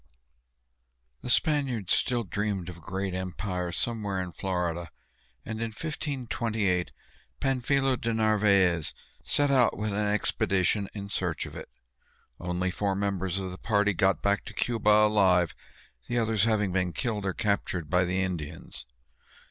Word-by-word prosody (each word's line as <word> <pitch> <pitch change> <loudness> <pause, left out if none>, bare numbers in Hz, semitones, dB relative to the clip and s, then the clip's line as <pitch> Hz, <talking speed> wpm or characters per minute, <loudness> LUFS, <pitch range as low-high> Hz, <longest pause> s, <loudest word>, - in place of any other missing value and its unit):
The - - -6
Spaniards 130 - +2
still 120 -2 +1
dreamed 100 -2 -2
of 90 - -8
a - - -15
great 95 +3 -3
empire 90 -1 -3
somewhere 105 -1 -1
in 90 -1 -3
Florida, 85 -2 -2 0.6
and 110 0 -4
in 115 - 0
1528 115 - -2 0.5
Pánfilo 135 0 +1
de 115 - 0
Narvaez 100 -6 +3 0.3
set 145 -1 +2
out 130 -4 +4
with 105 0 -2
an 105 +1 0
expedition 100 -1 +1
in 100 -1 -6
search 90 -6 -1
of - - -9
it. - - -8 0.7
Only 90 +1 -1
four 100 0 -1
members 95 -2 -1
of 95 -1 -3
the 90 - -9
party 105 -2 +2
got 95 +2 +2
back 100 0 +2
to 110 - -9
Cuba 115 -2 +1
alive, 100 -5 +5 0.5
the 120 - -1
others 110 -2 +2
having 105 -4 +2
been 90 -1 0
killed 110 -5 -2
or 95 -1 -1
captured 100 -6 -1
by 90 +4 +3
the 95 +2 0
Indians. 80 -8 -5
100 Hz, 145 wpm, -28 LUFS, 90-110 Hz, 0.7 s, alive